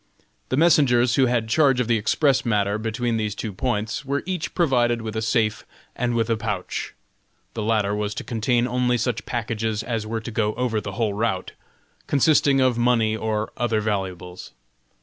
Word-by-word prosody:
The 130 Hz, -, 0 dB
messengers 125 Hz, -7 st, +4 dB
who 130 Hz, +1 st, +4 dB
had 120 Hz, -2 st, 0 dB
charge 135 Hz, +1 st, +3 dB
of 125 Hz, -, 0 dB
the 115 Hz, -2 st, +2 dB
express 135 Hz, +6 st, +2 dB
matter 105 Hz, -3 st, 0 dB
between 115 Hz, +1 st, -1 dB
these 105 Hz, -2 st, -2 dB
two 110 Hz, -3 st, -5 dB
points 115 Hz, +5 st, -2 dB
were 140 Hz, +1 st, -2 dB
each 180 Hz, -3 st, -4 dB
provided 120 Hz, -8 st, +2 dB
with 110 Hz, -1 st, -5 dB
a 110 Hz, -, -1 dB
safe 110 Hz, -1 st, 0 dB, 0.3 s
and 120 Hz, -1 st, -1 dB
with 115 Hz, -1 st, +1 dB
a 115 Hz, -, +1 dB
pouch. 105 Hz, -4 st, -4 dB, 0.6 s
The 115 Hz, -, -4 dB
latter 105 Hz, -2 st, +1 dB
was 105 Hz, 0 st, -2 dB
to -, -, -4 dB
contain 120 Hz, +1 st, 0 dB
only 125 Hz, 0 st, +1 dB
such 120 Hz, -1 st, -2 dB
packages 110 Hz, -2 st, -2 dB
as 115 Hz, -3 st, -3 dB
were 110 Hz, 0 st, -3 dB
to 115 Hz, -, -7 dB
go 105 Hz, -1 st, 0 dB
over 120 Hz, -4 st, -1 dB
the 105 Hz, -, -6 dB
whole 110 Hz, -1 st, -1 dB
route, 105 Hz, -2 st, -2 dB, 0.6 s
consisting 140 Hz, -1 st, +3 dB
of 130 Hz, -2 st, +2 dB
money 115 Hz, -2 st, +2 dB
or 110 Hz, -1 st, -2 dB
other 115 Hz, -2 st, +1 dB
valuables. 95 Hz, -4 st, -4 dB
115 Hz, 180 wpm, -23 LUFS, 110-125 Hz, 0.6 s, messengers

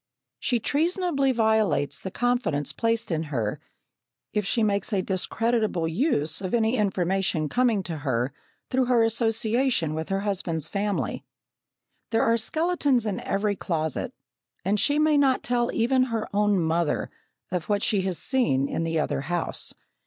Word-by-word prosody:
She 240 Hz, -, +1 dB
treasonably 310 Hz, -, +1 dB
violates 220 Hz, -, +1 dB
the 190 Hz, -, -5 dB
confidence 245 Hz, -, 0 dB
placed 230 Hz, -3 st, 0 dB
in 160 Hz, 0 st, -1 dB
her 115 Hz, -7 st, -2 dB, 0.7 s
if 210 Hz, -2 st, 0 dB
she 230 Hz, +1 st, +2 dB
makes 200 Hz, +1 st, 0 dB
a 195 Hz, -3 st, +1 dB
discreditable 215 Hz, -1 st, 0 dB
use 160 Hz, -, +1 dB
of 185 Hz, +3 st, -1 dB
any 225 Hz, +1 st, +2 dB
information 190 Hz, -6 st, 0 dB
coming 235 Hz, -, +1 dB
to 170 Hz, -2 st, -4 dB
her 130 Hz, -2 st, -1 dB, 0.4 s
through 260 Hz, 0 st, +2 dB
her 240 Hz, -2 st, +3 dB
association 225 Hz, -, +1 dB
with 160 Hz, 0 st, -4 dB
her 195 Hz, 0 st, 0 dB
husband's 175 Hz, -6 st, -1 dB
family. 205 Hz, +1 st, -2 dB, 0.9 s
There 225 Hz, -, +2 dB
are 230 Hz, -, +3 dB
skeletons 290 Hz, -1 st, +1 dB
in 205 Hz, -3 st, -2 dB
every 205 Hz, +1 st, -1 dB
closet, 160 Hz, -5 st, -2 dB, 0.5 s
and 205 Hz, +2 st, +1 dB
she 290 Hz, +7 st, +2 dB
may 305 Hz, -1 st, +4 dB
not 270 Hz, -2 st, +3 dB
tell 240 Hz, -1 st, 0 dB
even 255 Hz, +3 st, +2 dB
her 230 Hz, -3 st, -3 dB
own 205 Hz, -1 st, +3 dB
mother 165 Hz, -1 st, 0 dB, 0.4 s
of 175 Hz, -3 st, -3 dB
what 205 Hz, 0 st, +1 dB
she 205 Hz, -3 st, +2 dB
has 185 Hz, -2 st, -2 dB
seen 225 Hz, -, +1 dB
in 165 Hz, -, -2 dB
the 165 Hz, -1 st, 0 dB
other 150 Hz, -, -1 dB
house. 175 Hz, +4 st, -3 dB
210 Hz, 150 wpm, -26 LUFS, 170-240 Hz, 0.9 s, may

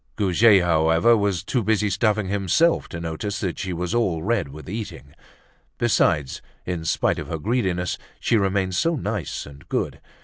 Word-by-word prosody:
Goujet, 100 Hz, 0 st, +4 dB
however, 80 Hz, +6 st, +4 dB
was 100 Hz, -4 st, 0 dB
too 125 Hz, -, 0 dB
busy 105 Hz, 0 st, +1 dB
stuffing 105 Hz, 0 st, +1 dB
himself 100 Hz, -, +2 dB
to 85 Hz, -, -6 dB
notice 85 Hz, +5 st, -4 dB
that 95 Hz, -4 st, -3 dB
she 95 Hz, -, -3 dB
was 90 Hz, +3 st, -3 dB
all 95 Hz, -9 st, 0 dB
red 105 Hz, -6 st, 0 dB
with 75 Hz, +3 st, -11 dB
eating. 95 Hz, -8 st, -7 dB, 0.6 s
Besides, 85 Hz, -, +1 dB, 0.2 s
in 85 Hz, -3 st, -3 dB
spite -, -, +1 dB
of -, -, -6 dB
her 80 Hz, -, -3 dB
greediness, 90 Hz, -2 st, -1 dB, 0.2 s
she -, -, +1 dB
remained 95 Hz, -2 st, +1 dB
so 165 Hz, -, +1 dB
nice 105 Hz, -, -3 dB
and 70 Hz, 0 st, -14 dB
good! -, -, -2 dB
95 Hz, 165 wpm, -23 LUFS, 85-110 Hz, 0.6 s, Goujet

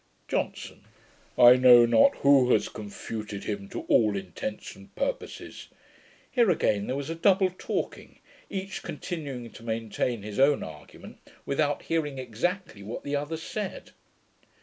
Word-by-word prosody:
JOHNSON. -, -, -3 dB, 0.5 s
'I 125 Hz, 0 st, +9 dB
know 125 Hz, -2 st, +8 dB
not 115 Hz, -1 st, +5 dB
WHO 140 Hz, -3 st, +4 dB
has -, -, +1 dB
confuted 105 Hz, -1 st, -7 dB
him 100 Hz, -2 st, -4 dB
to -, -, -5 dB
ALL 105 Hz, -3 st, +3 dB
INTENTS 95 Hz, -, -6 dB
AND -, -, -17 dB
PURPOSES.' -, -, -4 dB, 0.6 s
Here 235 Hz, -5 st, +3 dB
again 105 Hz, -, +1 dB
there 130 Hz, -, -2 dB
was 140 Hz, +3 st, -4 dB
a -, -, -1 dB
double 185 Hz, +2 st, +3 dB
talking, 185 Hz, -, -5 dB, 0.3 s
each 195 Hz, -1 st, -5 dB
continuing 140 Hz, -9 st, -6 dB
to -, -, -13 dB
maintain 115 Hz, 0 st, -2 dB
his 105 Hz, +1 st, -6 dB
own 140 Hz, +1 st, +4 dB
argument, 75 Hz, -1 st, -11 dB, 0.3 s
without 145 Hz, +1 st, 0 dB
hearing 150 Hz, -4 st, -1 dB
exactly 130 Hz, -, -3 dB
what 105 Hz, +4 st, -7 dB
the 145 Hz, 0 st, -2 dB
other 145 Hz, +3 st, -3 dB
said. 190 Hz, +4 st, -6 dB
130 Hz, 140 wpm, -27 LUFS, 110-165 Hz, 0.6 s, I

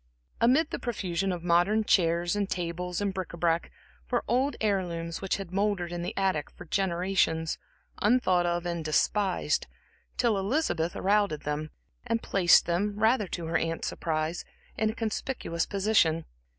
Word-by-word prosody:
Amid 280 Hz, +7 st, +3 dB
the -, -, -3 dB
profusion 195 Hz, -6 st, -2 dB
of 175 Hz, -2 st, -4 dB
modern 175 Hz, +5 st, +3 dB
chairs 175 Hz, -2 st, +2 dB
and 200 Hz, -1 st, -1 dB
tables 180 Hz, +1 st, -3 dB
and 200 Hz, -1 st, 0 dB
bric 185 Hz, -2 st, -4 dB
à 170 Hz, -, -9 dB
brac 165 Hz, 0 st, +1 dB, 0.4 s
were -, -, +1 dB
old 260 Hz, +5 st, +1 dB
heirlooms 175 Hz, -5 st, -1 dB
which 195 Hz, -, -1 dB
had 195 Hz, -3 st, -7 dB
mouldered 195 Hz, -3 st, 0 dB
in 175 Hz, 0 st, -3 dB
the 175 Hz, -, -5 dB
attic 190 Hz, -7 st, 0 dB
for -, -, -12 dB
generations, 175 Hz, -3 st, 0 dB, 0.4 s
un 235 Hz, +5 st, +4 dB
thought 180 Hz, -6 st, +2 dB
of 175 Hz, 0 st, -1 dB
and 170 Hz, -2 st, -2 dB
despised, 190 Hz, -, +1 dB, 0.5 s
till 230 Hz, -5 st, +2 dB
Elizabeth 190 Hz, -, 0 dB
routed 200 Hz, -5 st, +1 dB
them 150 Hz, +1 st, -2 dB
out -, -, -12 dB, 0.4 s
and 230 Hz, 0 st, 0 dB
placed 180 Hz, -4 st, +5 dB
them, 200 Hz, +4 st, -1 dB
rather 220 Hz, -1 st, +3 dB
to 175 Hz, -1 st, -5 dB
her 165 Hz, -, +1 dB
aunts' 165 Hz, 0 st, -2 dB
surprise, 160 Hz, +1 st, -2 dB, 0.3 s
in 220 Hz, -, +1 dB
a 220 Hz, -, -4 dB
conspicuous 220 Hz, -6 st, -2 dB
position. 195 Hz, -6 st, +2 dB
185 Hz, 165 wpm, -28 LUFS, 170-210 Hz, 0.5 s, placed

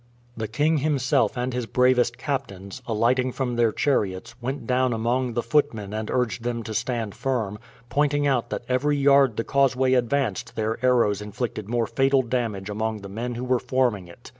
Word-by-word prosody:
The 110 Hz, -1 st, -3 dB
king 150 Hz, +8 st, +1 dB
himself 135 Hz, -4 st, +1 dB
and 125 Hz, +1 st, -2 dB
his 125 Hz, -2 st, -3 dB
bravest 125 Hz, -1 st, +2 dB
captains, 100 Hz, -5 st, -4 dB
alighting 120 Hz, +3 st, +1 dB
from 125 Hz, -3 st, -2 dB
their 120 Hz, -2 st, +3 dB
chariots, 100 Hz, -9 st, -1 dB
went 135 Hz, +4 st, -4 dB
down 130 Hz, -1 st, +1 dB
among 120 Hz, +2 st, 0 dB
the 120 Hz, -, 0 dB
footmen 110 Hz, -9 st, 0 dB
and 110 Hz, 0 st, -3 dB
urged 120 Hz, -6 st, 0 dB
them 120 Hz, -1 st, -3 dB
to 110 Hz, -, -6 dB
stand 115 Hz, -2 st, -2 dB
firm, 110 Hz, -6 st, -2 dB, 0.3 s
pointing 145 Hz, +2 st, +1 dB
out 130 Hz, -4 st, +1 dB
that -, -, -4 dB
every 145 Hz, +3 st, +1 dB
yard 140 Hz, -4 st, +4 dB
the 115 Hz, -, 0 dB
causeway 130 Hz, -1 st, +2 dB
advanced 125 Hz, -3 st, 0 dB
their 110 Hz, +2 st, -2 dB
arrows 115 Hz, -5 st, +3 dB
inflicted 105 Hz, 0 st, -4 dB
more 120 Hz, -1 st, +1 dB
fatal 135 Hz, +2 st, +2 dB
damage 115 Hz, -5 st, -2 dB
among 110 Hz, +1 st, -3 dB
the 100 Hz, -, -8 dB
men 120 Hz, +4 st, -4 dB
who 120 Hz, -, -4 dB
were 125 Hz, -1 st, +1 dB
forming 120 Hz, -9 st, 0 dB
it. 85 Hz, +8 st, -14 dB
120 Hz, 180 wpm, -24 LUFS, 110-130 Hz, 0.3 s, yard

